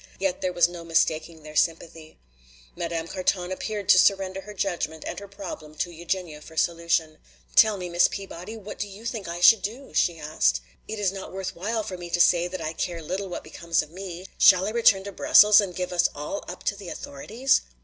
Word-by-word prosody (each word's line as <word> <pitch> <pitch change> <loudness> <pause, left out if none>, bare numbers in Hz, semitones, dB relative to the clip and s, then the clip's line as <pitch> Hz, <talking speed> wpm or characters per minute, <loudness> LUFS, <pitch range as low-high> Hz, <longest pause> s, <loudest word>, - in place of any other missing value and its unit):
Yet 190 -1 -1
there 185 -1 0
was 175 -1 +4
no 175 -1 -9
mistaking 165 -1 0
their 155 0 -11
sympathy. 165 -1 -1 0.6
Madame 165 -1 -3
Carton 185 0 -1
appeared 205 +1 -4
to 185 - +8
surrender 195 -1 +2
her 210 +2 -10
judgment 170 -5 -2
and - - -4
her 200 - -10
problem 190 -6 -9
to 175 +3 -2
Eugenia 170 -2 -4
for 160 +1 -14
solution. 170 -2 0 0.4
"Tell 215 -2 +6
me, 180 -1 -5
Miss 175 0 +4
Peabody, 195 +2 -7
what 210 -1 -9
do 205 - -2
you 200 +3 -12
think 225 -5 -4
I 170 +1 -5
should 220 +4 +7
do?" 240 +7 -6
she 170 -2 +2
asked. 105 - +1 0.3
"It 220 - -5
is 200 -3 +1
not 195 -1 -8
worth 190 0 -5
while 220 +5 -2
for 185 -3 -6
me 175 0 -7
to 175 - -1
say 175 0 +4
that 185 -1 -6
I 155 +1 -3
care 170 +1 -3
little 190 +4 -4
what 175 - -6
becomes 165 +1 -1
of 155 - -14
me. 185 0 -8
Shall 185 0 +7
I 210 - -1
return 220 -4 +4
to 200 - -6
Brussels 210 +2 +7
and 185 -3 -5
give 180 0 -3
us 175 - +3
all 150 +7 -5
up - - -8
to 200 - 0
the 195 -3 -9
authorities?" 225 - 0
180 Hz, 215 wpm, -25 LUFS, 165-200 Hz, 0.6 s, to